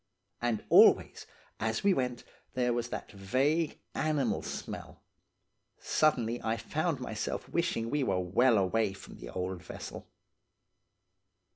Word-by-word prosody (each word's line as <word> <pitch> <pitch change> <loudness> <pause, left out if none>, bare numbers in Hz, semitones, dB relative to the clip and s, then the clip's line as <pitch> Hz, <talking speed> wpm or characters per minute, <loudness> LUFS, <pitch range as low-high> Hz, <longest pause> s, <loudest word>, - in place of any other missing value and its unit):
"And 120 -3 0
always, - - +6 0.3
as 110 0 -1
we 200 -1 +5
went, 125 -5 -2 0.3
there 125 -1 +2
was 120 0 -2
that - - -6
vague, 135 - 0 0.2
animal 150 -1 0
smell; - - -7 0.7
suddenly 120 -6 +1
I 110 +1 0
found 150 +6 -1
myself 110 -4 -4
wishing 120 -9 -1
we 150 - +1
were 95 -8 +1
well 110 +7 +3
away 100 +2 +1
from 95 - -12
the - - -8
old 90 +5 -4
vessel. - - -8
120 Hz, 125 wpm, -31 LUFS, 105-140 Hz, 0.7 s, always